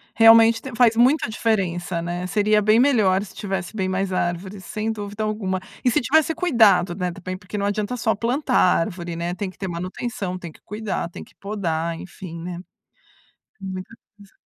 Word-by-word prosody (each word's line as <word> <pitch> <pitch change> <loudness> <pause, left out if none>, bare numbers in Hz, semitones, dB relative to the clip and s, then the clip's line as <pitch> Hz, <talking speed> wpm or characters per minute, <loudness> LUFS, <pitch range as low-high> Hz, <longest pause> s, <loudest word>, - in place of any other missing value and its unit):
Realmente 225 0 +7
te 265 - -8
faz 230 -1 +4
muita 255 +1 +4
diferença, 185 -6 -1
né? 175 +1 -3
Seria 210 +2 +2
bem 215 +2 +4
melhor 215 -8 +3
se 205 - -12
tivesse 190 -2 -4
bem 190 -3 -1
mais 190 0 -1
árvores, 185 +2 -3
sem 215 +1 -2
dúvida 205 0 -5
alguma. 200 -3 -2 0.2
E 250 - +6
se 235 - +2
tivesse 315 +6 +2
cuidado, 220 - +4
né, 180 -1 -2
também, 185 +1 -6
porque 195 +2 -7
não 200 - -1
adianta 210 +4 -1
só 225 -2 +1
plantar 250 +5 0
árvore, 175 -1 +1
né? 170 +1 -3
Tem 190 +1 -4
que - - -15
ter 195 - -4
manutenção, 185 +2 -4
tem 170 -3 -8
que - - -20
cuidar, 210 -4 -3
tem - - -9
que - - -20
podar, 170 -5 -2
enfim, 175 -2 -9
né? 175 0 -5 1.0
Muita 190 +3 -6 0.2
coisa. 200 -1 -17
200 Hz, 185 wpm, -23 LUFS, 180-225 Hz, 1.0 s, Realmente